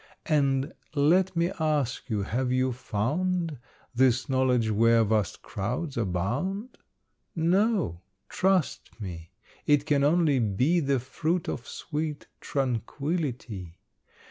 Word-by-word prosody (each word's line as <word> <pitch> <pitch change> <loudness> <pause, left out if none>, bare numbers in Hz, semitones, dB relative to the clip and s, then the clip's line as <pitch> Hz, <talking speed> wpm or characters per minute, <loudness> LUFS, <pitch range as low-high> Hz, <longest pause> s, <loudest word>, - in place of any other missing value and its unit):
And 140 0 +1 0.2
let 175 +6 +3
me 170 +2 +1
ask 145 -5 0
you, 105 -3 0
have 125 +5 -1
you 130 0 +2
found 145 - -1 0.3
This 125 0 +3
knowledge 130 -4 +2
where 115 +2 +4
vast 105 -3 0
crowds 125 - -3
abound? 120 - -2 0.6
No; 180 - +1 0.3
trust 185 -10 0
me, 85 -5 -7 0.4
it 145 -1 +4
can 145 -2 +2
only 150 -2 +3
be 125 - +2
The 140 -4 +1
fruit 160 +7 -2
of 125 - -4
sweet 150 -1 -4
tranquillity. 125 - -3
135 Hz, 110 wpm, -27 LUFS, 115-160 Hz, 0.6 s, where